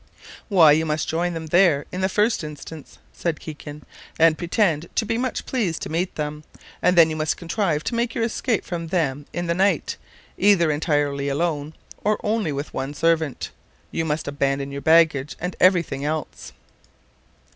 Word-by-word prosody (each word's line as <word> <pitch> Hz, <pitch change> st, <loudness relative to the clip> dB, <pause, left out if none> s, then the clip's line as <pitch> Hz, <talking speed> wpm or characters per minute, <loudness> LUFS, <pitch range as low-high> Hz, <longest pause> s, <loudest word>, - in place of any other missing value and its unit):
"Why, 170 Hz, -7 st, +7 dB
you 155 Hz, +2 st, +3 dB
must 155 Hz, -1 st, -1 dB
join 170 Hz, +2 st, -1 dB
them 160 Hz, -1 st, -5 dB, 0.4 s
in 185 Hz, -, -4 dB
the 190 Hz, -, +1 dB
first 210 Hz, 0 st, +1 dB
instance," 150 Hz, 0 st, -9 dB, 0.2 s
said 170 Hz, -3 st, -2 dB
Kikin, 150 Hz, -1 st, -9 dB, 0.3 s
"and 160 Hz, -1 st, +5 dB
pretend 170 Hz, -2 st, 0 dB
to 220 Hz, -, +1 dB
be 225 Hz, -, -1 dB
much 255 Hz, +2 st, -2 dB
pleased 200 Hz, -11 st, -1 dB
to -, -, -5 dB
meet 175 Hz, +3 st, -1 dB
them; 150 Hz, 0 st, -4 dB, 0.4 s
and 180 Hz, 0 st, +3 dB
then 165 Hz, -1 st, +7 dB
you -, -, -3 dB
must 155 Hz, 0 st, -1 dB
contrive 170 Hz, -3 st, -1 dB
to -, -, -3 dB
make 235 Hz, 0 st, -1 dB
your 230 Hz, -, 0 dB
escape 230 Hz, -1 st, -1 dB
from 170 Hz, -2 st, -4 dB
them 145 Hz, -5 st, -1 dB
in 175 Hz, -, -3 dB
the 170 Hz, -, +1 dB
night, 195 Hz, +3 st, +1 dB, 0.4 s
either 185 Hz, -6 st, +4 dB
entirely 145 Hz, -2 st, 0 dB
alone, 150 Hz, 0 st, -2 dB, 0.3 s
or 210 Hz, +1 st, +1 dB
only 210 Hz, -6 st, 0 dB
with 140 Hz, +1 st, -5 dB
one 135 Hz, +2 st, -4 dB
servant. 160 Hz, -3 st, 0 dB, 0.4 s
You 165 Hz, -, -1 dB
must 155 Hz, 0 st, -2 dB
abandon 140 Hz, -1 st, -1 dB
your 140 Hz, 0 st, -5 dB
baggage 160 Hz, -3 st, +3 dB
and 180 Hz, +1 st, -4 dB
every 185 Hz, -2 st, +5 dB
thing 140 Hz, -3 st, -6 dB
else. 155 Hz, +1 st, -4 dB
160 Hz, 175 wpm, -23 LUFS, 150-180 Hz, 0.4 s, Why